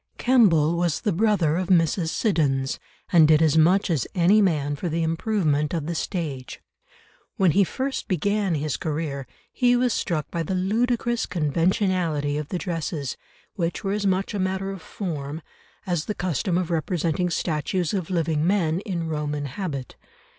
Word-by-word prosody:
Kemble 170 - +4
was 170 -3 0
the 210 - 0
brother 180 -5 +2
of 185 -1 -2
Mrs. 165 -2 +2
Siddons, 140 - 0 0.3
and 160 -3 +7
did 155 -1 +5
as 160 -2 +3
much 175 +5 +4
as 145 -8 0
any 190 +4 +5
man 150 -7 +1
for 175 +4 -3
the 165 +1 -1
improvement 160 -3 0
of 160 -3 -2
the 170 - -2
stage; 155 -7 -4 0.8
when 190 -5 +4
he 200 +5 +4
first 265 +8 -3
began 200 0 0
his 150 -3 -2
career, 150 -4 -3 0.3
he 245 -1 +3
was 245 -1 +2
struck 155 -4 -2
by 170 - -2
the 175 +4 -2
ludicrous 235 +5 0
conventionality 170 -2 0
of 150 -1 -3
the 180 - -2
dresses, 165 -6 -3 0.4
which 170 -1 -2
were 195 - -1
as 205 -1 0
much 190 +2 0
a 205 - -2
matter 190 +1 -1
of 195 -3 -7
form 155 -6 -5 0.5
as 175 -5 -1
the 210 - -3
custom 175 0 -1
of 180 -2 -2
representing 170 +1 0
statues 170 +1 -1
of 185 -5 -2
living 160 -4 0
men 175 -4 +1
"in 180 -5 -3
Roman 150 -2 -2
habit." 140 -2 -5
170 Hz, 165 wpm, -24 LUFS, 155-195 Hz, 0.8 s, and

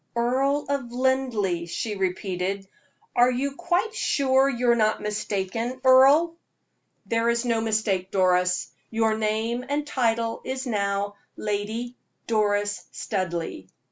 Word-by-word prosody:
"Earl 265 +5 +1
of 275 -4 -2
Linleigh?" 245 -9 0
she 210 +5 -3
repeated. 190 0 -2 0.5
"Are 245 +1 +5
you 260 +3 -1
quite 350 +7 0
sure 270 - +2
you 245 -2 +2
are - - +4
not 215 -2 +2
mistaken, 210 +4 -3
Earle?" 275 +6 +6 0.7
"There 230 0 +1
is 235 +1 +1
no 230 -2 +1
mistake, 215 -4 0
Doris; 180 -1 +2 0.2
your 225 -1 +1
name 220 +3 -1
and 290 +1 -1
title 230 -4 0
is 260 +1 -4
now 200 -3 -1 0.2
Lady 215 +4 -3 0.3
Doris 205 -2 0
Studleigh. 170 - -3
225 Hz, 120 wpm, -25 LUFS, 205-260 Hz, 0.7 s, Earle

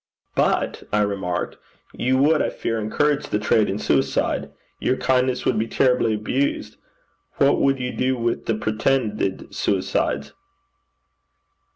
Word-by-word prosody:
'But,' - - +1
I 105 - +2
remarked, 95 -4 -2 0.4
'you 130 +1 +1
would, 150 +4 +4
I - - +1
fear, 115 -1 -3
encourage 145 +7 0
the - - 0
trade 105 0 +2
in 95 - -1
suicide. - - 0 0.3
Your 130 - +1
kindness 130 -1 +1
would 115 - +2
be 110 - 0
terribly 125 -3 +2
abused. 125 +6 -2 0.6
What 140 0 +3
would 135 -1 +2
you 125 0 -2
do 130 0 0
with 115 0 -2
the 115 - +1
pretended 110 -2 -1
suicides?' - - -1
120 Hz, 135 wpm, -22 LUFS, 105-130 Hz, 0.6 s, would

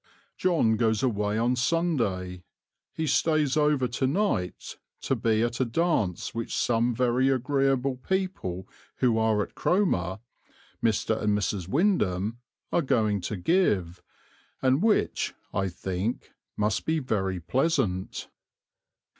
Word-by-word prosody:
John 160 -12 +2
goes 110 -1 +1
away 105 -4 0
on 120 +3 +2
Sunday; 120 - 0 0.5
he 160 - -3
stays 150 -1 +2
over 150 -4 +2
to 120 +3 -1
night 140 - -1 0.2
to - - 0
be 110 -1 +1
at 120 0 -2
a - - +3
dance 115 - 0
which 115 0 -3
some 120 0 +1
very 125 +2 +2
agreeable 135 0 +1
people 130 - -3 0.3
who 120 -3 +2
are 110 -2 +2
at - - -11
Cromer 95 - +1 0.7
Mr. 110 0 +1
and 105 -1 +2
Mrs. 100 -3 -2
Windham 115 - +1 0.3
are 175 - +2
going 110 - +1
to 100 +3 -4
give, 95 - +1 0.6
and 130 +3 +2
which, 220 0 +1 0.2
I 95 -1 0
think, 95 +6 -4 0.3
must 105 -1 0
be 160 0 +2
very 95 - -1
pleasant." 125 - -1
120 Hz, 125 wpm, -27 LUFS, 100-140 Hz, 0.7 s, a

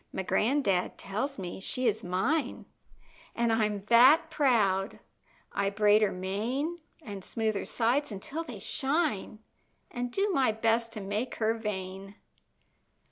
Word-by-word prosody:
My - - -3
gran'dad 210 -4 +1
tells 220 +8 -3
me 180 -2 -6
she 255 +6 -3
is 220 -2 +1
mine, 240 - -1 0.7
An' 235 -1 +1
I'm 210 -3 0
that 250 +8 +6
proud! 210 -8 +2 0.5
I 200 0 +1
braid 210 +1 +4
her 210 -2 +3
mane, 230 - -2 0.2
An' 200 -6 -7
smooth 220 +3 -1
her 200 - -4
sides 250 +4 +1
until 275 +11 -5
they 250 -9 -8
shine, 265 - -1 0.5
An' 245 0 -3
do 395 +11 0
my 260 -7 +3
best 225 +1 +1
to 215 - -6
make 205 +6 -3
her 220 0 +1
vain. 195 -2 -5
220 Hz, 135 wpm, -29 LUFS, 200-255 Hz, 0.7 s, that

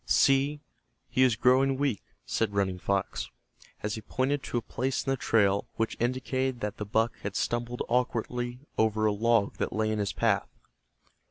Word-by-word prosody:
"See, 140 +2 +3 0.5
he 130 - +2
is 125 -4 +5
growing 130 +4 +3
weak," 135 -7 0 0.2
said 105 -3 -1
Running 95 -2 0
Fox, 100 +1 -1 0.5
as 105 0 -1
he 110 - -5
pointed 135 +5 -1
to - - -2
a - - 0
place 130 +3 -2
in 135 - 0
the - - +2
trail 100 -5 +2
which 115 0 -1
indicated 130 +1 -1
that 105 -1 -3
the 105 - -4
buck 110 +3 +1
had 100 0 -5
stumbled 120 +1 -1
awkwardly 120 0 -1 0.2
over 110 0 +2
a 105 - +4
log 115 0 +2
that - - -1
lay 110 0 0
in 110 - -1
his 100 -1 0
path. - - +1
120 Hz, 175 wpm, -29 LUFS, 105-130 Hz, 0.5 s, is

